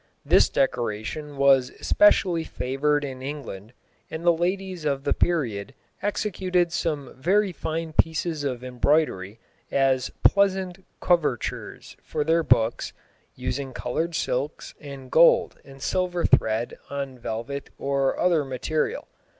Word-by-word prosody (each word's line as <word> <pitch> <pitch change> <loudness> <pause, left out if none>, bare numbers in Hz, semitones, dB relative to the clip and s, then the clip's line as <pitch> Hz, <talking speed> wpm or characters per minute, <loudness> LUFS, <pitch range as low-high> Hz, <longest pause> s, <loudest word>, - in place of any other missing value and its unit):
This - - +5
decoration 135 +3 -2
was 135 -2 +4
especially 185 -5 +4
favoured 145 +2 -1
in 130 -2 -7
England, 130 -7 -7 0.4
and 160 +2 -6
the 170 - +6
ladies 185 +1 -2
of 140 -2 -1
the 140 - +1
period 130 -8 -1 0.3
executed 185 -4 0
some 150 -6 -2
very 190 +8 +2
fine 160 -1 -4
pieces 160 -1 +1
of 130 -3 -3
embroidery 125 -6 0 0.3
as 135 -2 +2
"pleasant 190 -2 +2 0.2
covertures" 155 -9 -1
for 150 - -2
their 165 +2 +3
books, 120 -6 +1 0.4
using 130 +1 -4
coloured 165 +7 -2
silks 140 +3 -2
and 140 -3 -10
gold 165 +1 +5
and 135 -1 -12
silver 180 -2 0
thread 110 +2 +2
on 135 -2 -5
velvet 115 +5 -5
or 135 -1 0
other 170 -4 +3
material. 135 +4 -2
145 Hz, 120 wpm, -25 LUFS, 130-170 Hz, 0.4 s, the